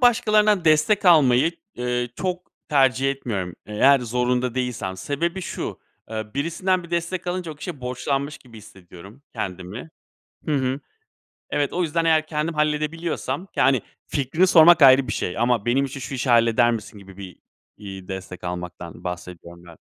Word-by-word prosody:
başkalarından 215 -5 +3
destek 155 +7 +3
almayı, 150 -4 +5 0.2
eee, 125 0 -2
çok 180 -1 -4 0.2
tercih 135 -2 +3
etmiyorum, 100 -10 -4
eğer 135 +6 +4
zorunda 125 +1 -1
değilsem. 115 -7 -3
Sebebi 170 - -2
şu; - - -5 0.3
eee, 110 -1 -3
birisinden 180 +5 0
bir 170 - -12
destek 170 +1 -2
alınca 175 -2 -3
o - - -13
kişiye 150 -1 -7
borçlanmış 135 +3 -3
gibi 115 -4 -15
hissediyorum 100 +3 -15
kendimi. 95 - -6 0.6
Hı 155 - 0
hı. 130 +1 -1 0.7
Evet, 145 -2 0
o 180 - 0
yüzden 165 0 0
eğer 160 -1 +3
kendim 155 +1 -2
halledebiliyorsam, 150 +1 -2
yani, 135 -4 +3 0.2
fikrini 150 +6 +1
sormak 170 -2 +7
ayrı 130 -1 +7
bir - - -1
şey 90 - -3
ama, 120 -2 +1
"Benim 135 +3 +2
için 135 0 -6
şu 135 - -6
işi 125 0 -1
halleder 115 0 +4
misin?" 110 -2 -5
gibi 95 -1 -14
bir, 95 -3 -10 0.4
iii, 95 -3 -9
destek 95 -1 -7
almaktan 90 -1 -7
bahsediyorum 90 -1 -8
ben. 85 -2 -14
130 Hz, 155 wpm, -23 LUFS, 110-160 Hz, 0.7 s, sormak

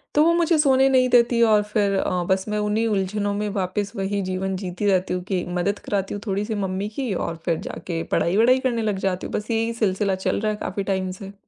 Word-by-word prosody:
तो 300 - +6
वो 335 +1 +4
मुझे 340 -1 +3
सोने 270 -2 +4
नहीं 255 -1 +4
देती 240 -1 +4
और 215 -2 +5
फिर 200 -2 +2
अ, 180 -2 0
बस 190 0 +1
मैं 210 - -1
उन्हीं 210 +2 0
उलझनों 205 0 -1
में 210 +1 -2
वापस 200 0 -2
वही 200 +1 -1
जीवन 185 +1 -2
जीती 185 +1 -4
रहती 185 -2 +2
हूँ 180 - -4
कि 185 -3 -1 0.2
मदद 200 +3 0
कराती 195 -2 -1
हूँ 205 - -6
थोड़ी-सी 205 +3 -1
मम्मी 190 +2 -3
की 260 -7 -1
और 170 -2 -3
फिर 170 -2 +1
जाके 165 -2 -4
पढ़ाई-वढ़ाई 230 +9 +3
करने 235 -2 -1
लग 210 -3 0
जाती 185 -1 -2
हूँ। - - -10
बस 210 +3 -3
यही 225 +1 0
सिलसिला 195 0 +1
चल - - +1
रहा 215 0 +1
है 210 - -4
काफ़ी 195 +2 -3
टाइम 190 -1 -1
से। 195 0 -8
205 Hz, 230 wpm, -23 LUFS, 190-225 Hz, 0.2 s, तो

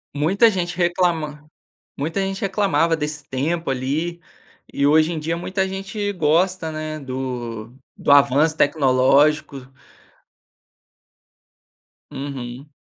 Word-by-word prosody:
Muita 190 +10 +4
gente 180 -4 -2
reclama 170 -4 0 0.5
muita 165 +7 -2
gente 195 0 -2
reclamava 190 -5 +1
desse 150 -2 -5
tempo 155 +4 -2
ali, 150 +7 -2 0.5
e 140 - +1
hoje 155 +2 +4
em 165 - -3
dia 165 +2 -2
muita 190 +2 -2
gente 195 +2 -4
gosta, 175 0 +1
né, 155 0 -5
do 125 -4 -5 0.2
do - - +1
avanço 145 +3 +4
tecnológico. 140 0 +2 2.4
Uhum. 135 -1 -7
155 Hz, 105 wpm, -21 LUFS, 140-175 Hz, 2.4 s, Muita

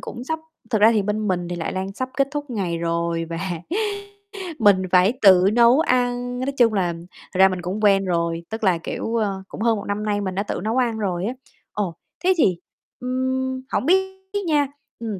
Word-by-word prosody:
cũng 245 - -7
sắp 320 +2 -2 0.3
thực 220 -3 +1
ra 225 +2 +7
thì 210 -2 +2
bên 210 +1 -1
mình 175 -2 -1
thì 175 - -4
lại 165 - -3
đang 190 +1 -3
sắp 255 +5 -4
kết 275 -1 +2
thúc 290 -1 -5
ngày 185 -7 -2
rồi 170 0 -1
và 165 0 -5 1.2
mình 200 -4 +5
phải 185 +5 +5
tự 185 -3 +7
nấu 240 +4 +6
ăn, 245 -3 0
nói 265 +2 -1
chung 230 -3 +4
là 180 -4 +1 0.4
thật 185 - -3
ra 190 0 +8
mình 185 -1 -4
cũng 190 +5 -4
quen 195 -1 +4
rồi, 170 -1 -1
tức 220 0 -5
là, 185 -3 +3
kiểu, 225 +7 -4
ơ, 200 -4 -1
cũng - - -8
hơn 230 -2 +2
1 200 - -6
năm 205 +1 -2
nay 205 -1 0
mình 190 -2 -3
đã 200 - 0
tự - - -4
nấu 225 +4 0
ăn 235 -3 +1
rồi 185 -3 -1
á. 240 - -2 0.4
Ồ. 190 -6 -2 0.3
Thế 375 +1 +5
thì, 185 - +3 0.4
ưm, 260 +1 -2
hổng - - 0
biết 380 +2 +2 0.3
nha, 295 -3 +3 0.3
ừm, 215 -5 -4
210 Hz, 215 wpm, -22 LUFS, 185-245 Hz, 1.2 s, ra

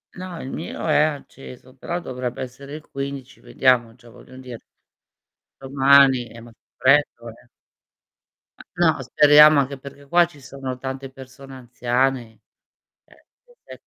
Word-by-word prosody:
No, 180 -2 -8
il 130 - -7
mio 165 - -6
è 155 -2 +3
acceso 135 -4 -6
però 170 +7 -5
dovrebbe 125 -5 -6
essere 140 +3 -10
il 155 - -12
15, 140 -1 -7
vediamo 120 -3 +1
già 120 -1 -19
voglio 130 - -16
dire 125 -3 -10 1.0
domani 135 -1 +4
è 115 +1 -13
molto 115 0 -17 0.2
freddo, 130 -3 +2
eh. 120 +2 -15 1.3
No, 165 -4 +2
speriamo 150 +3 +6
anche 140 0 -2
perché 140 +1 -13
qua 175 +4 +4
ci 150 -4 -17
sono 130 -1 -8
tante 135 0 -7
persone 135 0 -13
anziane, 125 -1 -2 0.7
che 485 -1 -19
135 Hz, 130 wpm, -21 LUFS, 125-145 Hz, 1.3 s, speriamo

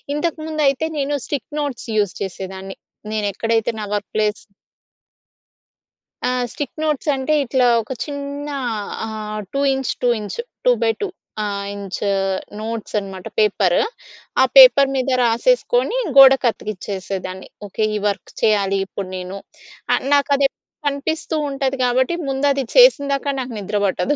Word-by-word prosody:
ఇంతకుముందు 310 -1 -2
అయితే 275 +4 -1
నేను 285 +1 0
స్టిక్ 285 - -4
నోట్స్ 275 -5 -4
యూజ్ 205 -3 +1
చేసేదాన్ని. 190 0 -6 0.4
నేను 215 -1 -1
ఎక్కడైతే 225 +2 0
నా - - -3
వర్క్ 205 - -4
ప్లేస్ 215 -1 0 1.8
ఆ! - - +2 0.2
స్టిక్ 290 +1 -6
నోట్స్ 300 -1 0
అంటే, 265 +3 -1
ఇట్లా 255 0 +2 0.2
ఒక 225 - -11
చిన్నా 285 0 -5 0.5
ఆహ్, 215 -1 -5
two 275 - 0
inch, 265 -1 -1
two 245 - +4
inch. 210 - -6 0.3
Two - - +6
by 225 - +3
two 410 - 0 0.4
ఆహ్, 200 -1 -3
ఇంచ్ 200 -2 -6 0.6
నోట్స్ 225 0 -5
అనమాట 195 -2 -8
పేపర్. 195 -4 +3 0.6
ఆ - - +7
పేపర్ 285 - +9
మీద 265 0 0
రాసేసుకొని - - +2 0.2
గోడ 270 0 +10
కత్తికిచ్చేసేదాన్ని. 195 -3 -4 0.2
ఓకే 215 +3 -2
ఈ 210 - -1
వర్క్ 200 - -3
చేయాలి 200 -3 +2
ఇప్పుడు 195 -1 -6
నేను. 185 +2 -6 0.6
ఆహ్, - - +1
నాకు 285 -1 +3
అది 280 0 +2
ఎప్పుడు - - -69 0.2
కనిపిస్తూ 300 +3 -2
ఉంటది 270 -1 -1
కాబట్టి 255 +5 +2 0.2
ముందు 270 +1 -1
అది 275 0 -1
చేసిందాకా 285 - +5
నాకు 255 -1 -5
నిద్ర 205 +1 -2
బట్టదు. 260 +9 0
245 Hz, 140 wpm, -20 LUFS, 205-285 Hz, 1.8 s, గోడ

